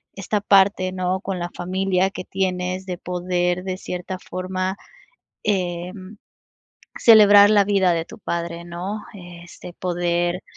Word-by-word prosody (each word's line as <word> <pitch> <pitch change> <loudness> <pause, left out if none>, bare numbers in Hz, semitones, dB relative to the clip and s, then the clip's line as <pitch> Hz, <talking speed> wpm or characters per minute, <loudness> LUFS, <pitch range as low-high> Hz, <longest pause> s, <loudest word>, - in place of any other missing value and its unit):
esta 200 +2 -2
parte, 195 -2 +3
¿no?, 185 0 -1
con 195 -2 -4
la 175 0 -4
familia 190 +1 0
que 195 - -7
tienes, 185 0 -2
de 180 - -4
poder 180 0 -2
de 185 -1 -3
cierta 180 0 -6
forma, 185 +1 -4 0.7
em, 185 +1 -3 0.8
celebrar 205 -3 +8
la 205 -1 +5
vida 195 -3 +2
de 165 -1 -1
tu - - -13
padre, 170 -2 -4
¿no?, 180 +5 -5 0.2
este, 175 -1 -11
poder 175 0 -1
185 Hz, 130 wpm, -22 LUFS, 175-195 Hz, 0.8 s, celebrar